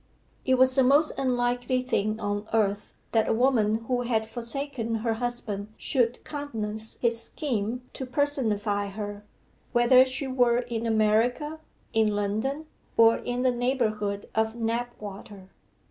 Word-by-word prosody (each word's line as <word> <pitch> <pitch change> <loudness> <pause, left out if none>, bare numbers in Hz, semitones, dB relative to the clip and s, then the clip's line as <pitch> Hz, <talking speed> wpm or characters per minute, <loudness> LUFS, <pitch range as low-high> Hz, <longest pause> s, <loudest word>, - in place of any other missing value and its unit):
It 260 - +4
was 260 0 +5
the 265 - +4
most 285 +4 +4
unlikely 245 0 0
thing 215 -4 -1
on 205 0 -2
earth 205 -2 +1 0.2
that 225 -1 +2
a - - +3
woman 225 -3 +3
who 250 -1 +1
had 225 -3 0
forsaken 235 0 -3
her 225 +1 0
husband 220 -4 -3
should 245 -3 0
countenance 220 -7 -4
his 230 -1 +2
scheme 245 -4 -3
to 265 - -5
personify 220 -8 0
her 205 0 -6 0.5
whether 245 +1 +6
she 260 +2 -3
were 245 -2 +3
in 235 -2 -3
America, 230 +8 +1 0.3
in 220 -2 +2
London, 220 +9 -1 0.3
or 230 0 +6
in 245 +1 -3
the 255 - +4
neighbourhood 220 -5 -1
of 220 +1 0
Knapwater. 225 -4 -5
235 Hz, 135 wpm, -27 LUFS, 215-255 Hz, 0.5 s, whether